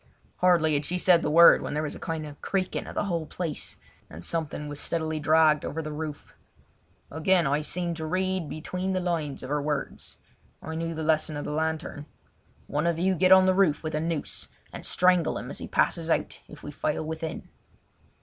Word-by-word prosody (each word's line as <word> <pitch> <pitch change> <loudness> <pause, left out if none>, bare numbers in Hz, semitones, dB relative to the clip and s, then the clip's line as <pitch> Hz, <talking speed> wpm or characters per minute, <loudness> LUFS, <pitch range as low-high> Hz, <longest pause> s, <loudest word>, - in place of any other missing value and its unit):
Hardly 170 -4 +3
had 145 0 +1
she 175 +5 -1
said 180 -2 +5
the - - -1
word 170 +3 +8
when - - -4
there 150 - 0
was 150 - -3
a - - -9
kind 160 -2 -4
of 145 -1 -11
creaking 190 -2 -2
of - - -8
the - - 0
whole 170 -5 -2
place, 165 -5 -4 0.3
and 85 +3 -8
something 155 -2 -3
was 145 0 -5
steadily 160 -2 -2
dragged 155 0 +4
over 160 - -4
the 155 -1 -4
roof. 150 -1 -6 0.8
Again 170 +3 +2
I 145 +2 +1
seemed 170 +2 -2
to 160 -1 -4
read 185 -1 -1
between 180 +4 -3
the 185 - +1
lines 165 -7 -2
of 130 - -7
her 145 0 0
words. 145 -1 -4 0.4
I 160 - -7
knew 165 0 -3
the 160 - -4
lesson 155 -1 +1
of 145 - -5
the - - -3
lantern. 160 -1 -3 0.6
"One 150 +3 -1
of 170 -1 +1
you 185 +3 +2
get 185 +1 +3
on 190 0 +8
the 185 - +4
roof 185 -6 +2
with 155 - -4
a 155 - 0
noose 165 -2 -3 0.3
and - - -5
strangle 180 -2 +3
him - - -6
as - - -5
he - - -6
passes 165 -1 +1
out - - 0
if 150 - -13
we 145 - -6
fail 150 +2 -2
within." 160 0 -5
160 Hz, 210 wpm, -27 LUFS, 150-175 Hz, 0.8 s, word